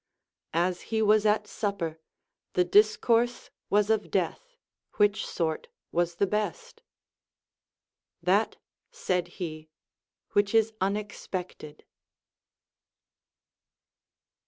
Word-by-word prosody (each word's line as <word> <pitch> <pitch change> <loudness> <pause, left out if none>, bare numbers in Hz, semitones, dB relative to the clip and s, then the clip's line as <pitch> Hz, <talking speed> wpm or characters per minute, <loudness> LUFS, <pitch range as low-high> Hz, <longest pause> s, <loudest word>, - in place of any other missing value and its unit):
As 175 +1 +1
he 225 - 0
was 215 0 +4
at 210 0 +2
supper, 195 -7 -3 0.5
the 180 - +4
discourse 225 +5 +3 0.2
was 210 +1 +3
of 220 -1 0
death, - - -2 0.4
which 205 0 +2
sort 160 -2 -2 0.2
was 175 0 0
the 200 - +2
best. 460 - -3 1.4
That, - - +2 0.3
said 180 -1 -1
he, 155 -4 -6 0.6
which 205 +1 +2
is 225 0 +4
unexpected. 190 -6 -4
205 Hz, 85 wpm, -28 LUFS, 175-215 Hz, 1.4 s, was